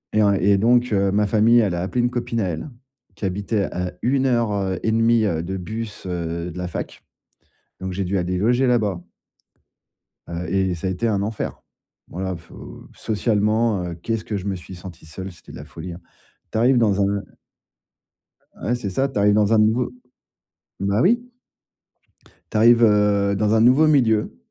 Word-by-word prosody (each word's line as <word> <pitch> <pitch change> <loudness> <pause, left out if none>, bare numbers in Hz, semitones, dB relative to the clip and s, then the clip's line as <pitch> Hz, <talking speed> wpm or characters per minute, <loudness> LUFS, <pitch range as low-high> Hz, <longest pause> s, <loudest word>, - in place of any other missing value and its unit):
Et 110 - +3
en 100 -1 +4
et 100 +1 +3
donc, 120 +4 +3
heu, 100 -1 +2
ma 105 +1 +2
famille, 110 +3 +4
elle 100 -6 +1
a 85 - -2
appelé 100 +7 -1
une 120 - +2
copine 120 -2 -2
à 95 - 0
elle, 85 - -5 0.5
qui - - -5
habitait 100 +2 -1
à 90 0 -4
1 135 +2 +1
heure, 120 -4 +1
heu, 95 -3 -1
et 110 - +1
demie, 115 0 +3
heu, 80 -6 0
de 95 +2 -4
bus, 110 +3 -6
heu, 85 -1 -4
de 85 - -10
la 90 0 -3
fac. 90 - -6 0.8
Donc, 95 0 -4
j'ai 95 +2 -2
dû 95 +2 -1
aller 90 +1 -1
loger 120 +6 +2
là-bas. 105 -8 +1 1.3
Heu 85 +1 -5
et 95 -2 +1
ça 85 +3 -4
a - - 0
été 95 +5 -1
un 100 -3 0
enfer. 105 +1 -4 0.5
Voilà 95 +1 -4
faut 85 0 -12
socialement, 110 -1 0
heu, 85 -1 -5
qu'est-ce 110 +6 -3
que 105 - -3
je 95 - -7
me 100 -1 -1
suis 90 +1 -10
senti 90 -2 -11
seul, 95 +5 -8
c'était 85 - -15
de - - -10
la 70 - -9
folie, 80 +3 -8
hein. 85 - -11 0.5
Tu - - -2
arrives 125 +3 +4
dans 105 -4 +2
un 100 0 0 1.4
ouais, 120 - -1
c'est 115 -5 -4
ça. 135 +9 0
Tu 135 - -6
arrives 105 0 +4
dans 105 +1 +3
un 110 - +5
nouveau 110 +4 +2 0.9
bah 100 +2 +1
oui! 240 - +2 1.2
Tu - - -1
arrives, 115 +2 +6
heu, 105 -2 +3
dans 105 +1 +1
un 110 - +4
nouveau 130 +7 +5
milieu. 115 -8 +2
100 Hz, 195 wpm, -22 LUFS, 95-115 Hz, 1.4 s, arrives